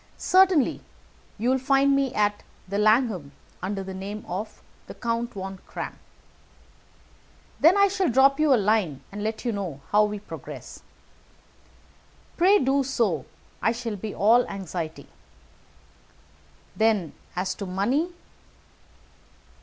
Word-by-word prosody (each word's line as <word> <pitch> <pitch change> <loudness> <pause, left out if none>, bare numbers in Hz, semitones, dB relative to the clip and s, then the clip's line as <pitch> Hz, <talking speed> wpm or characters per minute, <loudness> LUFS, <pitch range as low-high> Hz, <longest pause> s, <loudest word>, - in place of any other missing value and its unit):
"Certainly. 370 -6 +3 0.6
You 235 +4 +1
will 265 - +2
find 275 +1 +3
me 275 -2 +1
at 205 0 +1 0.3
the 200 +2 -2
Langham, 215 - +2 0.3
under 195 +1 -3
the 190 0 -7
name 200 +3 -6
of 195 +5 -6 0.2
the - - -9
Count 235 0 -2
von 190 -1 -6
Kramm." - - -6 1.6
"Then 335 +6 +6
I 400 0 +6
shall 380 -3 0
drop 270 +4 +4
you 305 -2 +3
a - - +7
line 200 - +1
to 205 - -6
let 220 +3 -3
you 240 - +1
know 190 -9 -4
how 210 +1 +5
we 210 0 -3
progress." 205 - -9 1.5
"Pray 380 +4 +5
do 275 -3 +2
so; 225 - 0 0.3
I 225 - +2
shall 230 -2 -4
be 205 +1 -6
all 230 +4 +5
anxiety." 175 -5 -5 1.7
"Then, 215 -7 +1 0.2
as 185 +1 -1
to 200 - -6
money?" 240 - 0
220 Hz, 130 wpm, -25 LUFS, 195-265 Hz, 1.7 s, a